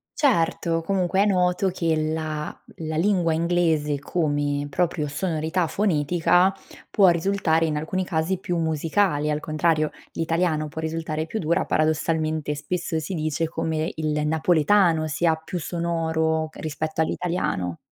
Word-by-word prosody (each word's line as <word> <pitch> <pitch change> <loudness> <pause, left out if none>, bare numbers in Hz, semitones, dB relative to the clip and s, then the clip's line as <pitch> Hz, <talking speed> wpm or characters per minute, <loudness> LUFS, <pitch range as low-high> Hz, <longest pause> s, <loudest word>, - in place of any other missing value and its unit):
Certo, 165 - +1
comunque 190 +1 +1
è - - +4
noto 180 -1 +2
che 165 -3 0
la 155 -1 -2 0.3
la 160 -1 -3
lingua 175 -1 +2
inglese 160 -4 +1
come 145 -2 -1
proprio 165 0 0
sonorità 160 +2 -1
fonetica, 175 0 +2 0.4
può 195 -3 +5
risultare, 170 -2 +2
in 150 -1 -1
alcuni 185 +5 -2
casi, 175 +1 -1
più 175 -2 -2
musicale, 160 0 +1
al 150 - 0
contrario, 155 0 +1 0.2
l'italiano 165 -2 0
può 160 +2 -6
risultare 160 -1 -3
più 220 - -4
dura, 170 +1 +1
paradossalmente; 155 -1 0
spesso 165 +1 -2
si 160 +5 -5
dice 155 0 -1
come 160 0 -2
il 150 -1 -1
napoletano, 160 +2 +3
sia 160 +2 +1
più 160 +3 -6
sonoro 160 -1 -1
rispetto 155 +1 -3
all'italiano. 160 - -1
160 Hz, 130 wpm, -24 LUFS, 155-175 Hz, 0.4 s, può